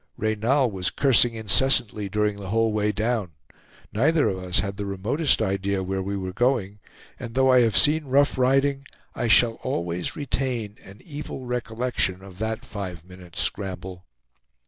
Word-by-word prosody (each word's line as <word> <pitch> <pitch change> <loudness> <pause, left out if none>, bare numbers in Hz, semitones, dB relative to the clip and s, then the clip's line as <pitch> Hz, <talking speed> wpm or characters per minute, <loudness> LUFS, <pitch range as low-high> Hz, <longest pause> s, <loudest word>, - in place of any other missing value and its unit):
Reynal 110 +4 +1
was 95 -2 0
cursing 120 -4 +3
incessantly 110 -2 +2
during 105 0 0
the 95 -2 -7
whole 115 +1 +1
way 105 0 +1
down. 110 -4 -2 0.6
Neither 150 +8 +3
of 95 - -3
us 90 0 -1
had 100 -1 -4
the 100 -1 -4
remotest 110 - 0
idea 95 0 -1
where 95 +1 -2
we 100 +1 -3
were 95 -1 -5
going; 110 -4 0 0.4
and 115 -1 -8
though 130 0 +4
I 130 - +6
have 115 -4 +2
seen 150 +1 +4
rough 140 +2 +3
riding, 135 +2 +2 0.3
I 120 - -2
shall 115 0 +4
always 90 -8 -3
retain 125 -6 -2
an 100 +5 -14
evil 145 -4 -7
recollection 120 -5 -2
of 95 -1 -13
that 110 0 -3
five 90 -5 -7
minutes' 90 -2 -8
scramble. 95 -2 -4
110 Hz, 160 wpm, -24 LUFS, 95-125 Hz, 0.6 s, I